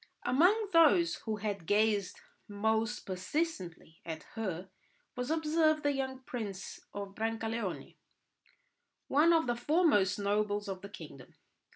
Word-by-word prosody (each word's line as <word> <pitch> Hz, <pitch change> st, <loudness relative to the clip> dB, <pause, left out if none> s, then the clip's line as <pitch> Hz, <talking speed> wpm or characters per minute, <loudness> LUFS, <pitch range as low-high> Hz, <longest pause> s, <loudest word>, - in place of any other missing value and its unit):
Among 375 Hz, -, +3 dB
those 330 Hz, +1 st, +5 dB
who 220 Hz, -, 0 dB
had 200 Hz, -5 st, -4 dB
gazed 205 Hz, -2 st, +2 dB, 0.3 s
most 220 Hz, +1 st, 0 dB
persistently 185 Hz, -, -4 dB
at 160 Hz, -1 st, -6 dB
her 190 Hz, -5 st, -4 dB, 0.4 s
was 250 Hz, +1 st, -3 dB
observed 315 Hz, -1 st, +2 dB
the 290 Hz, -, +3 dB
young 265 Hz, -1 st, -3 dB
Prince 205 Hz, -7 st, -6 dB
of 200 Hz, -1 st, -6 dB
Brancaleone, 225 Hz, -2 st, -3 dB, 1.1 s
one 300 Hz, +5 st, +5 dB
of 325 Hz, -1 st, +4 dB
the 240 Hz, -1 st, 0 dB
foremost 240 Hz, -, +3 dB
nobles 205 Hz, 0 st, 0 dB
of 190 Hz, -1 st, -5 dB
the 200 Hz, -, -8 dB
kingdom. 205 Hz, -, -11 dB
220 Hz, 125 wpm, -32 LUFS, 200-300 Hz, 1.1 s, those